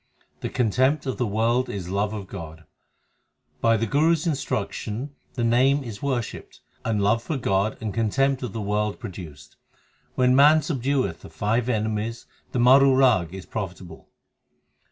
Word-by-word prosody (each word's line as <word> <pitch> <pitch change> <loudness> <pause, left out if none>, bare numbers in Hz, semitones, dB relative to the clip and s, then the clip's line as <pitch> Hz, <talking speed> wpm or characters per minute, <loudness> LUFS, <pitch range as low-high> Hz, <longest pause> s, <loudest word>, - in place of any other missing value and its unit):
The - - -4
contempt 130 +5 +1
of 130 -1 -3
the 125 - +1
world 115 +5 +1
is 95 -4 -5
love 100 +2 0
of 105 -3 -5
God: 80 -2 -9 1.0
By 115 0 +3
the 115 - 0
Guru 155 +6 +3
s 165 0 -2
instruction 130 - -3 0.2
the 120 - -1
Name 130 +4 +3
is 110 -5 -8
worshipped 130 -5 -4 0.2
and 110 -2 0
love 110 +3 +2
for 150 +5 -3
God 100 -3 0
and 110 -3 -4
contempt 135 +4 +1
of 125 - -4
the 115 - -5
world 105 0 -1
produced. 80 -8 -10 0.6
When 125 0 +3
man 150 +3 +6
subdueth 140 -2 -1
the - - -12
five 115 +3 -1
enemies 110 0 -2 0.3
the - - -2
Maru 130 +2 +6
Rag 125 -11 +4
3 95 - -8
is 95 - -9
profitable. 90 -4 -7
115 Hz, 160 wpm, -24 LUFS, 105-130 Hz, 1.0 s, man